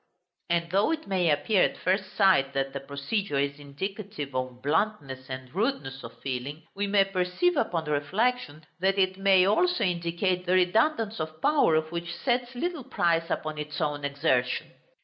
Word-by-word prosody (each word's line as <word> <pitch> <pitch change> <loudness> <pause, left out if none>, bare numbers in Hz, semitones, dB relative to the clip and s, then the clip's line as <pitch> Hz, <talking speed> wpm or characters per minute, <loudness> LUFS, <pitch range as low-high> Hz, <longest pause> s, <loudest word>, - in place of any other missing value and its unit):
And 170 0 0
though 200 +3 +3
it 320 -1 -2
may 185 -3 +1
appear, 155 +7 +2
at - - +2
first 190 +1 -1
sight, 180 -9 +4
that 135 0 -1
the 140 - -3
procedure 140 +6 -3
is 140 +1 -1
indicative 185 +2 -6
of 130 -1 -4
bluntness 145 -5 -1
and 130 0 -7
rudeness 190 - -2
of 115 - -10
feeling, 135 +4 -4
we 200 +1 -1
may 200 -1 +4
perceive, 195 - 0
upon 170 - 0
reflection, 155 +2 -1
that 195 +2 +2
it 190 0 +1
may 195 -2 +5
also 360 - +2
indicate 180 +1 -1
the 180 - +2
redundance 220 - +2
of 155 0 -5
power 280 - +4
which 170 +2 -6
sets 245 -1 -1
little 330 +2 -3
price 165 -5 +1
upon 155 -1 -3
its 150 0 -5
own 145 -2 -1
exertion. 140 -3 0
175 Hz, 165 wpm, -27 LUFS, 145-200 Hz, -, may